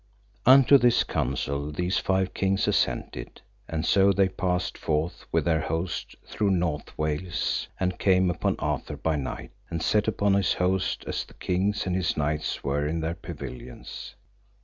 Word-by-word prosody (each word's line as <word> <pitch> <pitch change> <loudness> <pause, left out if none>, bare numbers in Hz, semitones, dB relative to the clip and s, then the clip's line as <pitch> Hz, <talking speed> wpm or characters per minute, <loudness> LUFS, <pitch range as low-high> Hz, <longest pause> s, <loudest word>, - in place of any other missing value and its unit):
Unto 135 +1 +8
this 120 -1 +4
counsel 70 +3 -2
these 90 +4 0
five 95 0 0
kings 95 0 +1
assented, - - -1 0.3
and 80 0 -2
so 100 +2 +5
they 95 0 +3
passed 90 -2 -1
forth 80 +3 -2
with - - +1
their 80 -2 +2
host 80 +3 -3
through 105 -2 -1
North 85 -6 -1
Wales, 75 +1 -1
and 90 -1 -1
came 95 -2 +3
upon 85 - 0
Arthur 75 - -3
by 80 +2 0
night, 70 -3 -5 0.2
and 85 -1 -3
set 105 0 +2
upon 100 -2 +2
his 100 -3 +3
host 95 +1 0
as - - -2
the - - -18
king 95 +3 0
and 90 -1 -1
his 90 -2 0
knights 75 +1 -1
were 70 +2 0
in 80 +2 -2
their 80 +1 -1
pavilions. 70 -8 -8
90 Hz, 160 wpm, -26 LUFS, 75-95 Hz, 0.3 s, Unto